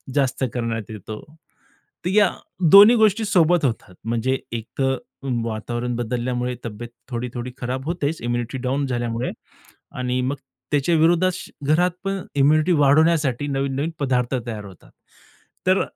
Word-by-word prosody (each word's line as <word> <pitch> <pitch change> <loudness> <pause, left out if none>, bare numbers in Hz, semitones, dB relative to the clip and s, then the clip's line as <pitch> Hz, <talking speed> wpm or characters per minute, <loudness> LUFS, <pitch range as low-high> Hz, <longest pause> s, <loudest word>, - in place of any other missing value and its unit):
जास्त 135 -2 +1
करण्यात 115 -3 -3
येतो. 105 +1 -7 0.9
तर - - +1
या 205 0 +5 0.4
दोन्ही 205 +4 +10
गोष्टी 220 0 +3
सोबत 175 -4 +3
होतात. 110 -6 -2
म्हणजे 120 +3 0 0.2
एक 115 -2 -3
तर 135 0 +2 0.5
वातावरण 120 +2 -3
बदलल्यामुळे 125 +1 -2
तब्येत 115 +1 -6 0.2
थोडी-थोडी 120 0 -4
खराब 130 +2 -4
होतेच 165 -2 -2
इम्युनिटी 120 +1 -2
डाउन 135 +2 0
झाल्यामुळे 120 -1 -2 0.7
आणि 125 0 -1
मग 135 +3 -1 0.4
त्याच्या 145 +4 +2
विरोधात 175 +3 +3 0.3
घरात 175 +4 +3
पण 195 -1 -2
इम्युनिटी 155 +5 +4
वाढवण्यासाठी 145 -2 +3
नवीन-नवीन 140 +2 -1
पदार्थ 130 -2 0
तयार 110 -3 -5
होतात. 95 -3 -14 0.8
तर 185 +1 +4
130 Hz, 130 wpm, -22 LUFS, 120-160 Hz, 0.9 s, दोन्ही